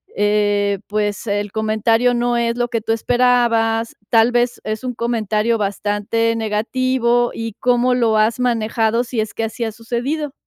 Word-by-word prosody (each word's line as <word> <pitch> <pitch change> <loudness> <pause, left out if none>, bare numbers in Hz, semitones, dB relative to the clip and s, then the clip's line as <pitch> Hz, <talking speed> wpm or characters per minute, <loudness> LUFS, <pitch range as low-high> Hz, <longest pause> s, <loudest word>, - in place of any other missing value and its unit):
eh, 205 -1 +1
pues, 210 +1 -2
el 205 0 -2
comentario 225 +3 +1
no 240 0 0
es 235 0 0
lo 240 0 -1
que 230 -2 -2
tú 225 - -2
esperabas, 230 -1 +1
tal 230 +1 +4
vez 240 0 0
es 215 +1 -4
un 250 -1 -4
comentario 225 -1 0
bastante 205 +3 -1
negativo 240 +2 0
y 225 -1 -5
¿cómo 250 0 +2
lo 230 -3 +2
has 220 +3 +2
manejado? 230 -1 +1
Sí 245 -1 -4
es 215 -1 -3
que 225 - -2
así 225 +2 -3
ha 225 - -2
sucedido. 250 +7 -3
230 Hz, 160 wpm, -19 LUFS, 215-240 Hz, -, tal